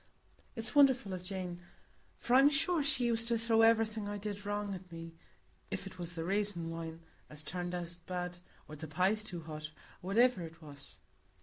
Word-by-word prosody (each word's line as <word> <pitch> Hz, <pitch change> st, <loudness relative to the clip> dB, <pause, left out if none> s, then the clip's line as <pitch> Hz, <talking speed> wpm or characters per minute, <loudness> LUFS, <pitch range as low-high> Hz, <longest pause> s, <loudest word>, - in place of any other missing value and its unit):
It's 225 Hz, -2 st, -2 dB
wonderful 265 Hz, -8 st, +5 dB
o' 185 Hz, -, -3 dB
Jane; 180 Hz, -1 st, -5 dB, 0.6 s
for 240 Hz, -, -1 dB
I'm 270 Hz, +3 st, +8 dB
sure 320 Hz, +3 st, +3 dB
she 270 Hz, -3 st, +4 dB
used 230 Hz, -1 st, +1 dB
to 235 Hz, 0 st, +2 dB
throw 225 Hz, 0 st, +3 dB
everything 225 Hz, -2 st, +3 dB
I 205 Hz, -, -3 dB
did 205 Hz, 0 st, -5 dB
wrong 205 Hz, -1 st, -1 dB
at 185 Hz, -1 st, -9 dB
me,—if 165 Hz, -, -9 dB
it 190 Hz, -1 st, -9 dB
was 175 Hz, 0 st, -5 dB
the 165 Hz, -, -3 dB
raisin 195 Hz, -3 st, 0 dB
wine 165 Hz, 0 st, -6 dB, 0.3 s
as 150 Hz, 0 st, -7 dB
turned 175 Hz, +1 st, -3 dB
out 175 Hz, -1 st, -4 dB
bad, 180 Hz, -1 st, -3 dB, 0.3 s
or 150 Hz, -, -8 dB
the 155 Hz, +1 st, -7 dB
pies 190 Hz, +7 st, +2 dB
too 175 Hz, -5 st, -5 dB
hot, 155 Hz, -1 st, -6 dB, 0.3 s
or 190 Hz, +3 st, -3 dB
whativer 245 Hz, -4 st, +5 dB
it 165 Hz, -1 st, -8 dB
was." 145 Hz, -3 st, -9 dB
190 Hz, 185 wpm, -34 LUFS, 165-225 Hz, 0.6 s, I'm